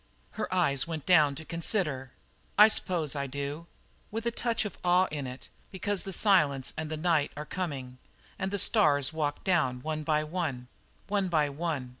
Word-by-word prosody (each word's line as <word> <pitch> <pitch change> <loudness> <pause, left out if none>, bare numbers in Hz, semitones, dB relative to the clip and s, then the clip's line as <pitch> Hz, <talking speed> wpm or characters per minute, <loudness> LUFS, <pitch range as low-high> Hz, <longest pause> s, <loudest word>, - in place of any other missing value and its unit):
Her 220 - -4
eyes 165 -6 +2
went 160 -3 -5
down 155 -6 +5
to 160 +3 -8
consider. 155 - 0 0.5
"I 210 +1 +9
s'pose 170 -8 +1
I 140 -1 -2
do." 140 +4 -5 0.4
"With 225 +2 -5
a 235 - +1
touch 235 -1 -1
of 210 - -7
awe 180 +1 +4
in 145 -3 -4
it, 125 +1 -9 0.2
because 200 0 -2
the 195 - -4
silence 150 -10 +2
and 160 -1 -4
the 155 - -3
night 155 -3 +1
are 150 - -5
coming, 135 -9 -5 0.4
and 190 0 -1
the 200 - -2
stars 150 - +3
walk 150 -2 -2
down, 130 -9 +1
one 155 0 -2
by 155 0 +1
one 150 -7 -4 0.4
one 200 -1 0
by 155 -4 +2
one. 145 -3 -3
155 Hz, 180 wpm, -29 LUFS, 140-185 Hz, 0.5 s, I